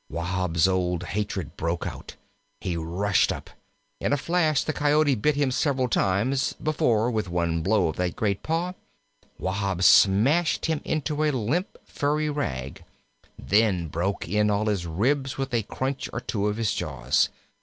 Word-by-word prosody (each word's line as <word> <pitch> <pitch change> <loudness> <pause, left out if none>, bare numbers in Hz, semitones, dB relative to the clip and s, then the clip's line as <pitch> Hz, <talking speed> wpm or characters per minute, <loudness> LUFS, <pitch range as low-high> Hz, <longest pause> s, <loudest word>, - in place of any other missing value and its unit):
Wahb's 85 -1 0
old 90 -1 0
hatred 95 -3 -3
broke 85 +1 -2
out. - - -7 0.4
He 90 - -3
rushed 90 +5 +1
up. - - -7 0.5
In - - -1
a - - +3
flash 155 -1 +1
the 155 - -2
Coyote 150 0 +3
bit 140 +6 +1
him 140 -2 +1
several 130 -1 +1
times 115 +5 +1
before, 120 -7 +1
with 110 -5 -2
one 85 -1 0
blow 100 +1 +2
of 80 - -6
that 90 -1 -1
great 100 -3 -1
paw, 170 +3 -1 0.6
Wahb 95 -1 -2
smashed 125 - +5
him 160 -2 0
into 150 0 -1
a 155 - +3
limp, 145 - -1
furry 150 +1 -1
rag; 70 - -4 0.5
then 100 -5 +1
broke 90 +5 -2
in 105 +3 +2
all 105 +1 +1
his 100 -5 -1
ribs 130 - 0
with 135 -1 -3
a 115 - +2
crunch 130 +6 -4
or 125 - -3
two 105 -4 -2
of 105 0 -1
his 115 -2 0
jaws. - - 0
105 Hz, 160 wpm, -25 LUFS, 90-140 Hz, 0.6 s, smashed